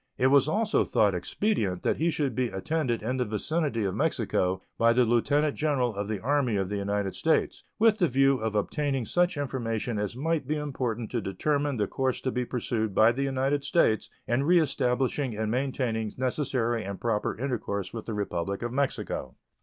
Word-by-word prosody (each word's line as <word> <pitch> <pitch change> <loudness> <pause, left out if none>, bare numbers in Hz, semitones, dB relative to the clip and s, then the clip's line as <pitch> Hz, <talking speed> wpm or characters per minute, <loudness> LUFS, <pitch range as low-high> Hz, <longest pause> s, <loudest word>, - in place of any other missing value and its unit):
It 130 +1 +3
was 140 0 +5
also 210 +6 +2
thought 105 -2 +2
expedient 95 - -1
that - - +1
he 165 +2 +1
should 145 -5 -1
be 125 +2 0
attended 120 +2 -2
in 125 +4 -1
the 125 - +1
vicinity 120 +3 -1
of 95 -2 -1
Mexico 100 - 0 0.2
by 115 0 +5
the 125 +1 +4
Lieutenant 140 +6 +2
General 135 -6 +1
of 100 0 -3
the 105 -2 -2
Army 135 -1 +1
of 95 -2 -1
the 105 - -2
United 100 -1 -1
States, - - 0
with 220 0 +4
the 175 - +4
view 135 0 +3
of 110 -1 -2
obtaining 135 +3 0
such 175 - +1
information 120 -5 -2
as 105 +1 -3
might 155 +1 -1
be 155 - 0
important 125 -6 -3
to 120 - -1
determine 140 +8 -1
the 105 - +1
course 130 +5 -1
to 130 - -1
be 125 0 -1
pursued 110 -4 -2
by 110 +1 +6
the 130 +4 -3
United 135 +1 0
States 140 -7 +2 0.2
in 120 +3 +1
reestablishing 135 -6 +1
and 110 0 -1
maintaining 125 -4 -1
necessary 125 -3 0
and 100 0 -6
proper 110 -3 -1
intercourse 115 -6 -3
with 115 -2 -6
the 115 - -3
Republic 100 0 -2
of 120 0 -3
Mexico. 130 - -2
125 Hz, 185 wpm, -28 LUFS, 110-140 Hz, 0.2 s, by